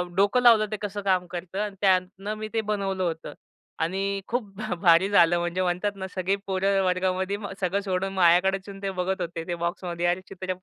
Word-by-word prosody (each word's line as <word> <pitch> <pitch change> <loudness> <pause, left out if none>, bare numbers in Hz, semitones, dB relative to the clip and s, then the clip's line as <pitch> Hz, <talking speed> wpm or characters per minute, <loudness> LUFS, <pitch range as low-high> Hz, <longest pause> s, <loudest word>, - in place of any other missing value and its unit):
डोकं 205 +6 +3
लावलं 230 -3 +6
ते 215 - -2
कसं 205 0 -4
काम 185 -2 +1
करतं 180 +2 -5
आणि 210 -2 -3
त्यातून 190 +1 +1
मी 215 - -4
ते 225 - +1
बनवलं 195 -2 -1
होतं 165 -2 -3 0.5
आणि 195 +4 -1
खूप 245 0 -1
भ 215 -3 -3
भारी 175 +2 +5
झालं 175 -3 +5
म्हणजे 175 +2 -1
म्हणतात 180 +3 0
ना 190 0 -5
सगळी 190 +2 +1
पोरं 195 0 +1
वर्गामध्ये 185 +1 0
व 200 -2 -7
सगळं 195 +2 0
सोडून 195 0 -2
माझ्याकडेच 185 +1 +4
येऊन 195 0 -9
ते 195 - -1
बघत 185 +1 -1
होते 170 -1 -4
ते 175 - -2
बॉक्समध्ये, 175 0 -2
"अरे 175 +1 +1
चित्रं 185 -1 -5
190 Hz, 200 wpm, -26 LUFS, 180-200 Hz, 0.5 s, लावलं